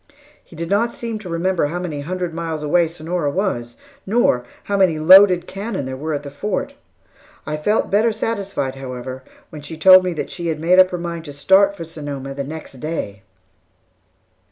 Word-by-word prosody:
He - - -16
did 165 +1 -4
not 215 +6 +1
seem 230 -2 -5
to 195 -4 -9
remember 170 -1 0
how 170 +4 -4
many 175 -5 -4
hundred 180 +2 -4
miles 165 -2 -4
away 165 +3 +3
Sonora 165 -1 -3
was, 140 - -2 0.3
nor 195 - +2 0.2
how 200 - -2
many 185 -5 +3
loaded 180 +2 +7
cannon 195 - -5
there 130 0 -5
were 155 +3 -3
at 145 - -5
the 140 - -8
Fort. 200 +8 -3 0.7
I 150 - -3
felt 210 +9 0
better 215 +3 +3
satisfied, 200 -11 -3
however, 130 -1 -7 0.3
when 150 - -9
she 155 +2 -8
told 185 +3 +8
me 180 -1 -1
that 155 - -5
she 170 -2 -5
had 160 -2 -2
made 175 +4 +4
up 185 0 +7
her 180 - -4
mind 170 -1 -5
to 145 - -8
start 195 +7 +3
for 170 - -5
Sonoma 145 -4 -7
the 140 0 -4
next 150 -2 -9
day. 120 -10 -4
165 Hz, 190 wpm, -20 LUFS, 145-190 Hz, 0.7 s, told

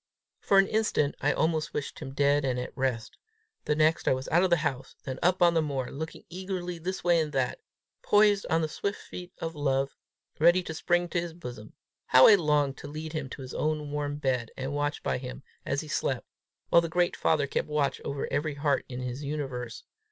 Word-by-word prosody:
For 195 - +3
an 195 - +7
instant 215 -9 +1
I 145 - +3
almost 160 0 0
wished 145 - -4
him 135 +1 -7
dead 145 0 +3
and 125 -2 0
at 125 - -6
rest; 130 -4 -2 0.5
the 150 - +1
next 155 +1 +2
I - - +5
was 130 +1 -6
out 175 - +4
of 190 - +3
the 170 - +4
house 135 -2 -3
then 130 -1 -5
up 180 +1 +3
on 170 -1 +6
the 165 - +3
moor, 140 -4 -3
looking 160 +3 -6
eagerly 180 -1 -5
this 185 +3 -4
way 175 -1 +4
and 155 -2 -1
that, 130 -2 0 0.4
poised 205 -1 +4
on 165 -1 +3
the - - +1
swift 200 +6 -3
feet 180 0 -9
of 165 0 -4
love, 135 -2 0 0.4
ready 175 +3 +5
to 160 - -5
spring 175 +2 +1
to 170 - 0
his 170 -1 -6
bosom. 120 -9 -9 0.3
How 130 0 +8
I 220 - +9
longed 150 -7 +2
to - - -8
lead 155 +2 -6
him 155 -4 -3
to 135 - -8
his 130 - -8
own 150 -1 -1
warm 145 0 -2
bed, 130 -5 -1
and 135 +2 -3
watch 145 +1 -2
by - - 0
him 130 +1 -8 0.2
as 140 +1 0
he 155 - -9
slept, 135 -4 -1 0.4
while 170 - +6
the 165 - -3
great 175 +1 +1
father 155 -3 +2
kept 140 - -2
watch 150 -2 0
over 140 0 -3
every 150 0 0
heart 140 -1 +1
in 125 0 -5
his 125 +3 -4
universe. 135 -5 -4
150 Hz, 220 wpm, -28 LUFS, 135-170 Hz, 0.5 s, I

